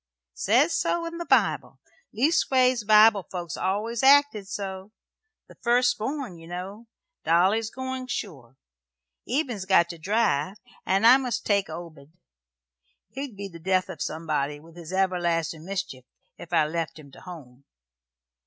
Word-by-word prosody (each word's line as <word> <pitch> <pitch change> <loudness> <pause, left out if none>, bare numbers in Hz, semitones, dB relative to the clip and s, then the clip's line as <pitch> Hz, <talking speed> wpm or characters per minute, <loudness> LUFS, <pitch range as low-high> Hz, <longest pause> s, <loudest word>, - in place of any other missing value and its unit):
"Says 250 - +2
so 340 -1 0
in 335 0 -6
the 340 - -6
Bible. - - +1 0.3
Leastways, 255 -3 +2
Bible 215 0 +6
folks 175 -2 -5
always 215 +5 -2
acted 275 -7 +4
so. 195 0 -6 0.6
The - - -15
first 245 +3 +3
born, 250 - -4
ye 165 - -13
know. 190 +6 -7 0.4
Dolly's 195 +7 +2
goin', 260 +1 -5
sure. 145 - -6 0.7
Eben's 245 -7 -2
got 170 -3 +4
to 170 -1 -8
drive, 190 -2 0 0.3
and 195 +3 +2
I 250 +3 +9
must 255 -4 -3
take 200 -2 +1
Obed. 160 -2 -10 0.9
He'd 270 -5 -7
be 200 0 -5
the 170 -3 -12
death 185 +2 0
of - - -8
somebody, 150 -2 -2
with 165 +2 -17
his 170 -1 -10
everlastin' 175 -4 -1
mischief, 185 -9 -5 0.3
if 170 - -12
I 155 - +3
left 165 +1 -4
him 145 -3 -14
to - - -15
home. 140 -7 -12
195 Hz, 145 wpm, -25 LUFS, 170-235 Hz, 0.9 s, I